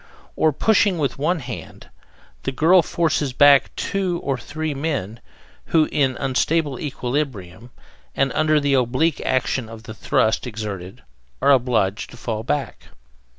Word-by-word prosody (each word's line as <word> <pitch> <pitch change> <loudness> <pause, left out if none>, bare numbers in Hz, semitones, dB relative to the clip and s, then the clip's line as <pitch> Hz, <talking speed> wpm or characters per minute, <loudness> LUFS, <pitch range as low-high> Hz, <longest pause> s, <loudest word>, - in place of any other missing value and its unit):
On 155 - +3
pushing 200 +3 +2
with 140 -3 -2
one 165 +3 0
hand, 125 -2 -9 0.5
the 135 - -3
girl 165 +7 +5
forces 155 -4 -1
back 140 +1 +6
two 185 -3 -2
or 135 -1 0
three 155 +5 -4
men, 135 - -3 0.5
who, 160 -2 +3
in 135 -4 +1
unstable 140 +1 0
equilibrium 125 - -4 0.5
and 135 -1 +1
under 155 0 +3
the 145 -1 0
oblique 135 +5 +1
action 130 -2 -1
of 115 -1 -10
the 110 - -8
thrust 110 +2 0
exerted, 105 -2 -7 0.4
are 140 - +4
obliged 115 -6 +1
to - - -13
fall 110 -2 -4
back. 135 +3 -3
135 Hz, 140 wpm, -21 LUFS, 120-155 Hz, 0.5 s, back